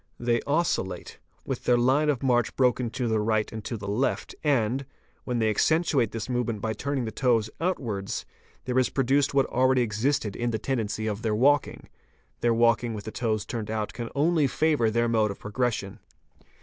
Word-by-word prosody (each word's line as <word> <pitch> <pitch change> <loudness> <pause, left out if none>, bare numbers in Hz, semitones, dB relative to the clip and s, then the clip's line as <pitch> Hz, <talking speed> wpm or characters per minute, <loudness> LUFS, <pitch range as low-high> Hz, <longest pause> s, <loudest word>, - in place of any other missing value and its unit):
They 120 -1 +1
oscil 150 - +1
late, 90 -2 -9 0.3
with - - -4
their 125 - +4
line 135 +5 +3
of 140 -3 0
march 120 -3 +2
broken 125 -2 +2
to 125 +1 -2
the 110 -1 +1
right 110 0 0
and 110 -1 -6
to 115 - -3
the 100 0 -7
left 110 +7 -1
and, 135 -3 +1 0.4
when 125 -1 -1
they 110 -1 +2
accentuate 150 - +2
this 115 0 -5
movement 120 -4 -1
by 110 +1 -2
turning 135 +3 -2
the 110 - -4
toes 115 -2 +1
outwards, 115 - -2 0.4
there 125 0 +1
is 130 - +2
produced 140 +1 +1
what 135 -1 +4
already 130 0 +2
existed 115 0 -1
in 120 0 -1
the 110 - -1
tendency 110 -3 -2
of 105 -1 -2
their 110 -2 0
walking: 140 +5 +2 0.5
their 120 - +2
walking 115 0 +2
with 105 - -6
the 110 - -6
toes 110 -3 -1 0.2
out 110 -1 -2
can 120 -2 -5
only 155 0 +3
favour 150 -5 +2
their 115 +2 +1
mode 110 -2 +2
of 100 - -5
progression. 105 -2 -2
120 Hz, 190 wpm, -26 LUFS, 110-135 Hz, 0.5 s, their